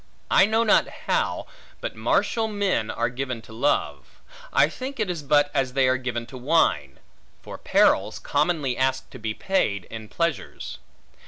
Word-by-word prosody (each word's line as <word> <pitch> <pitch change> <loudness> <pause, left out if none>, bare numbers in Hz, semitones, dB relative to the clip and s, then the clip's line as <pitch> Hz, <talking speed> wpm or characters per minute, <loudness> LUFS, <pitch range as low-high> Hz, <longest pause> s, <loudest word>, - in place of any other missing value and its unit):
I 190 - +6
know 220 +1 +2
not 220 - +4 0.2
how, - - 0 0.3
but - - -5
martial 225 -2 +1
men 200 - 0
are - - 0
given 125 0 -4
to 110 - -13
love: 135 +6 -1 0.3
I - - +5
think, 260 0 -7
it 210 -4 0
is 170 -3 -5
but 145 0 +3
as 135 -3 0
they 135 -1 +3
are 130 0 +3
given 120 -2 -4
to 130 +2 -10
wine; 120 - +1 0.5
for - - -9
perils - - +3
commonly 150 -8 0
ask 130 0 0
to 130 - -10
be 110 -1 -3
paid 105 - 0
in 110 -1 -7
pleasures. 170 -4 -3
135 Hz, 165 wpm, -24 LUFS, 125-180 Hz, 0.5 s, I